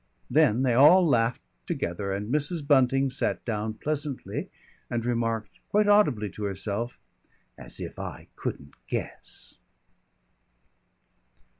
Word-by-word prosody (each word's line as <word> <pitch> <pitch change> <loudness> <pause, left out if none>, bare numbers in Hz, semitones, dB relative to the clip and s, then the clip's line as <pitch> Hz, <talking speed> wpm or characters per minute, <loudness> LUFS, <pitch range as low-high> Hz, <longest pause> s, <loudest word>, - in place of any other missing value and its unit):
Then 115 +5 +4
they 125 -2 +3
all 155 +8 +7
laughed 115 -4 +2 0.2
together, 95 +3 -2
and 105 +5 -3
Mrs. 150 +1 0
Bunting 135 -1 +4
sat 130 - -1
down 110 -1 -2
pleasantly 145 +2 -3 0.4
and 120 -1 -2
remarked, 115 -2 -1
quite 210 0 +3
audibly 150 - +4
to 105 - -7
herself, 100 +4 -3 0.6
"As - - -7
if - - -7
I - - -7
couldn't 70 0 -5
guess." - - -5
120 Hz, 115 wpm, -27 LUFS, 110-145 Hz, 0.6 s, all